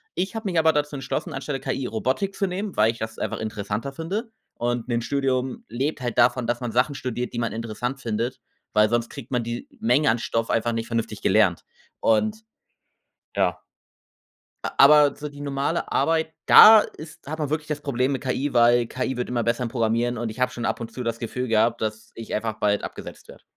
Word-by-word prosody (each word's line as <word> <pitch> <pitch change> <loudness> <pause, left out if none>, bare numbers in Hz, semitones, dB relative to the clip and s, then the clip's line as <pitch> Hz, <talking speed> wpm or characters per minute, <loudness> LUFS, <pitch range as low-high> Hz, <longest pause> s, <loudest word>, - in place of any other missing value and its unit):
Ich 190 +5 -2
habe 225 0 -5
mich 175 - -2
aber 160 0 +5
dazu 150 0 -1
entschlossen, 135 -1 -4
anstelle 140 -2 -4
KI 135 - -3
Robotik 130 - -1
zu 195 - 0
nehmen, 190 +2 -4
weil 110 +1 +5
ich 115 - -13
das 110 0 -5
einfach - - -3
interessanter 110 +4 -4
finde. 195 - -4 0.2
Und, 120 0 -2
‘n 120 -1 0
Studium 130 -1 -1
lebt 135 +8 -2
halt 120 -2 -3
davon, 120 +1 +3
dass 120 0 0
man 120 -2 -3
Sachen 125 +5 +2
studiert, 125 -1 -4
die 120 - -3
man 115 -2 -1
interessant 115 +4 -4
findet, 120 +3 -2 0.3
weil 105 0 +5
sonst 120 0 0
kriegt 135 -4 -10
man 125 -2 0
die 120 +1 -5
Menge 125 +6 +3
an 115 - -1
Stoff 115 0 -2
einfach 115 +1 +1
nicht 115 0 -3
vernünftig 115 -3 -3
gelernt - - +3 0.4
und 215 - +2 1.0
ja. - - +1 1.1
A - - -2
aber 145 0 +7
so 150 - -5
die 145 0 -10
normale 140 +3 -2
Arbeit, 160 -1 +1
da 220 0 +10
ist 155 -7 -7
hat 155 +2 -4
man 150 -3 -2
wirklich 155 0 -2
das 150 -2 -3
Problem 135 -1 0
mit 135 - -4
KI, 135 +2 -1
weil 120 0 +4
KI 130 +1 -3
wird 125 - -2
immer 120 -1 -1
besser 115 +2 0
im 120 - -2
Programmieren 115 +1 0
und 115 0 -3
ich 110 - -9
habe 125 - +1
schon 120 - -6
ab - - -1
und 115 -1 -6
zu 125 - -5
das 115 -1 -2
Gefühl 125 +2 -4
gehabt, 115 +1 +2
dass 110 0 -4
ich 115 - -7
einfach 110 +1 -1
bald 105 -1 +2
abgesetzt - - -8
werde. - - -14
125 Hz, 210 wpm, -24 LUFS, 115-145 Hz, 1.1 s, da